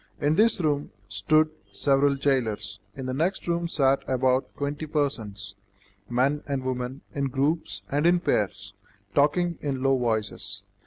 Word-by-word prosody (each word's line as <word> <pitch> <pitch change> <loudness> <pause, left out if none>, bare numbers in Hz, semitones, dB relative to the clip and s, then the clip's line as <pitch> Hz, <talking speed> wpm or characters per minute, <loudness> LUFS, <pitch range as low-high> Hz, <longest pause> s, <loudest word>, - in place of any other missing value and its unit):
In 145 0 +2
this 215 +4 +4
room 150 -3 0 0.2
stood 155 +12 +2 0.2
several 140 0 +3
jailers. 110 -7 0 0.2
In 135 - -6
the 130 - -2
next 170 +9 -1
room 170 0 0
sat 140 -4 +2
about 130 0 +2
twenty 145 +2 -3
persons, 110 -9 -2 0.6
men 135 +5 +2
and 140 -2 -2
women 130 +1 -3
in 140 -1 -1
groups 140 +5 -1
and 145 +4 +3
in 175 0 +5
pairs, 100 - -1 0.4
talking 170 +4 +2
in 135 -3 -2
low 135 0 +4
voices. 110 -4 -1
135 Hz, 145 wpm, -26 LUFS, 125-150 Hz, 0.6 s, in